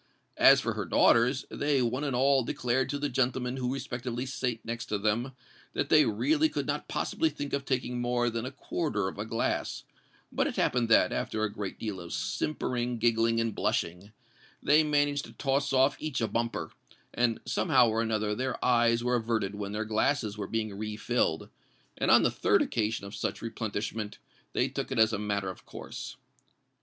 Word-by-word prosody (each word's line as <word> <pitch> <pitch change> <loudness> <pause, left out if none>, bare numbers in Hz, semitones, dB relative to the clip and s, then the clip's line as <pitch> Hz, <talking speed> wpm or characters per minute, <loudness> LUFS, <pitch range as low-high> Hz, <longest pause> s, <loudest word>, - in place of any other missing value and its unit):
As - - +8
for - - -1
her - - -3
daughters, 125 +3 +3
they 145 -1 +1
one 125 +4 -1
and 140 -4 -1
all 135 +1 +4
declared 125 +2 0
to 145 - -1
the 145 +1 -1
gentlemen 130 -1 0
who 125 -1 -1
respectively 125 -2 -4
sate 125 -3 -3
next 115 +1 -4
to 105 - -1
them, 110 +6 0 0.4
that - - -1
they - - +6
really 310 - +2
could - - -3
not - - -2
possibly 320 - 0
think 145 - -6
of 140 0 -1
taking 125 -2 -1
more 120 0 +1
than 115 0 -3
a 130 - -3
quarter 130 - -2
of 95 - -6
a 105 - -2
glass; 115 - -2 0.5
but - - +1
it - - -4
happened 120 -2 +1
that, 90 -5 +5
after 110 0 -2
a 105 -1 -1
great 100 -2 -5
deal 105 -4 -4
of 85 - -8
simpering, 125 -5 -2
giggling, 115 0 +2
and 115 -1 0
blushing, 90 +5 -2 0.5
they 150 +2 +5
managed 145 -1 +1
to - - -13
toss 140 0 0
off 135 +1 +3
each 155 -4 -3
a 115 - +1
bumper; 115 +1 -2 0.4
and 120 -2 +1
somehow 130 -8 +3
or 110 0 +1
another 110 -2 0
their 130 +3 -2
eyes 120 -1 +3
were 125 0 +2
averted 110 -4 -1
when 100 -1 -5
their 110 +1 -2
glasses 110 0 0
were 105 - -5
being 110 -3 -2
refilled; 105 -4 -1 0.5
and - - -1
on - - +7
the - - +3
third - - +3
occasion 110 -2 -1
of 100 - -9
such - - -3
replenishment, 110 -1 -4 0.4
they - - +2
took - - -4
it - - -2
as 110 0 +4
a 105 - -1
matter 100 -2 -1
of - - -14
course. - - -8
120 Hz, 190 wpm, -29 LUFS, 110-130 Hz, 0.5 s, As